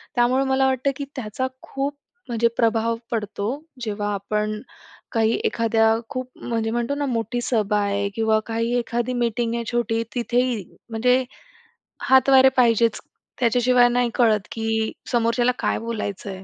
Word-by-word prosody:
त्यामुळे 250 Hz, +2 st, +3 dB
मला 265 Hz, 0 st, +3 dB
वाटतं, 265 Hz, +1 st, +1 dB
की 280 Hz, -, -4 dB
त्याचा 255 Hz, 0 st, -3 dB, 0.2 s
खूप 275 Hz, +1 st, -3 dB, 0.3 s
म्हणजे 235 Hz, -1 st, +2 dB
प्रभाव 230 Hz, 0 st, +2 dB, 0.2 s
पडतो 210 Hz, -3 st, -3 dB, 0.4 s
जेव्हा 205 Hz, -2 st, -2 dB
आपण 210 Hz, +2 st, -1 dB, 0.6 s
काही 225 Hz, -2 st, +2 dB
एखाद्या 225 Hz, -, +2 dB
खूप 255 Hz, -2 st, -4 dB
म्हणजे 225 Hz, -2 st, -2 dB
म्हणतो 240 Hz, +4 st, -1 dB
ना 285 Hz, 0 st, -1 dB
मोठी 240 Hz, -1 st, -2 dB
सभा 210 Hz, -4 st, +1 dB
आहे 200 Hz, 0 st, 0 dB
किंवा 220 Hz, -1 st, +2 dB
काही 230 Hz, +1 st, -1 dB
एखादी 240 Hz, +1 st, -1 dB
मीटिंग 235 Hz, -1 st, 0 dB
आहे, 235 Hz, -, -2 dB
छोटी 230 Hz, -1 st, 0 dB
तिथेही 245 Hz, -2 st, 0 dB, 0.3 s
म्हणजे 250 Hz, +3 st, +2 dB, 0.9 s
हातवारे 265 Hz, 0 st, +7 dB
पाहिजेच, 230 Hz, -2 st, +3 dB, 0.4 s
त्याच्याशिवाय 245 Hz, +1 st, +4 dB
नाही 245 Hz, 0 st, +1 dB
कळत, 215 Hz, -4 st, +3 dB
की 225 Hz, -1 st, -1 dB, 0.2 s
समोरच्याला 240 Hz, +1 st, +2 dB
काय -, -, 0 dB
बोलायचं 210 Hz, -4 st, -4 dB
आहे. 190 Hz, -1 st, -7 dB
235 Hz, 140 wpm, -23 LUFS, 220-250 Hz, 0.9 s, हातवारे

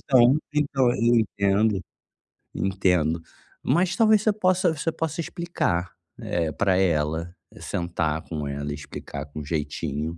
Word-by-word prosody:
então, 130 Hz, +1 st, +5 dB, 0.2 s
então 140 Hz, -3 st, +2 dB
eu 120 Hz, +1 st, +3 dB
entendo, 100 Hz, -1 st, +1 dB, 0.8 s
entendo, 90 Hz, -4 st, +1 dB, 0.4 s
mas 175 Hz, +7 st, +2 dB
talvez 215 Hz, -2 st, +5 dB
você 215 Hz, -, +3 dB
possa 185 Hz, -3 st, +2 dB
você 160 Hz, +2 st, -2 dB
possa 160 Hz, 0 st, -3 dB
explicar, 170 Hz, -, -2 dB, 0.3 s
eh, 85 Hz, -2 st, -1 dB
pra 95 Hz, -2 st, +2 dB
ela, 85 Hz, -1 st, 0 dB, 0.2 s
sentar 80 Hz, -3 st, -2 dB
com 75 Hz, -4 st, -5 dB
ela, 70 Hz, +1 st, -4 dB
e -, -, -3 dB
explicar 75 Hz, 0 st, -7 dB
com 75 Hz, +1 st, -8 dB
jeitinho 75 Hz, +1 st, -3 dB
95 Hz, 130 wpm, -25 LUFS, -, 0.8 s, então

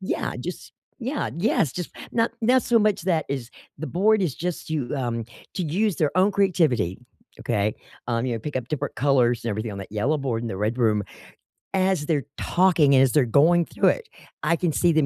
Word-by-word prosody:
Yeah, 190 Hz, -, -2 dB
just -, -, -7 dB, 0.3 s
yeah, 265 Hz, +3 st, -2 dB
yes, 170 Hz, -, +1 dB
just 180 Hz, -2 st, -5 dB, 0.2 s
not 230 Hz, 0 st, +1 dB
not 250 Hz, +3 st, +4 dB
so 235 Hz, -1 st, +3 dB
much 210 Hz, -4 st, +1 dB
that 165 Hz, -4 st, 0 dB
is 130 Hz, -3 st, -4 dB, 0.3 s
the 155 Hz, -, -4 dB
board 210 Hz, +5 st, +2 dB
is 160 Hz, -8 st, -1 dB
just 175 Hz, 0 st, -4 dB
to, 150 Hz, -5 st, -2 dB
um, 120 Hz, -4 st, -2 dB, 0.3 s
to 185 Hz, -, -2 dB
use 185 Hz, +5 st, 0 dB
their 150 Hz, +1 st, 0 dB
own 190 Hz, +3 st, +4 dB
creativity, 160 Hz, -, +1 dB, 0.4 s
okay? 105 Hz, -2 st, 0 dB, 0.3 s
Um, 115 Hz, 0 st, 0 dB
you 125 Hz, -, -1 dB
know, 115 Hz, -, -2 dB
pick 145 Hz, +4 st, -5 dB
up 125 Hz, -2 st, -4 dB
different 150 Hz, -, -3 dB
colors 125 Hz, -4 st, +2 dB
and 115 Hz, -, -1 dB
everything 110 Hz, +1 st, -3 dB
on 100 Hz, -, -7 dB
that 95 Hz, -, -8 dB
yellow 130 Hz, +9 st, 0 dB
board 120 Hz, -4 st, -2 dB
in 120 Hz, -, -3 dB
the 95 Hz, -, -4 dB
red 110 Hz, +5 st, -1 dB
room. 110 Hz, -4 st, +2 dB, 0.7 s
As 185 Hz, -5 st, +1 dB
they're 150 Hz, -4 st, 0 dB
talking, 170 Hz, -6 st, +3 dB
as 130 Hz, -1 st, +4 dB
they're 145 Hz, -4 st, +4 dB
going 165 Hz, +8 st, +4 dB
through -, -, +2 dB
it, 475 Hz, -2 st, -2 dB, 0.4 s
I 170 Hz, -, +3 dB
can 170 Hz, 0 st, 0 dB
see 175 Hz, +3 st, +3 dB
them 155 Hz, -3 st, +3 dB
150 Hz, 205 wpm, -24 LUFS, 120-185 Hz, 0.7 s, not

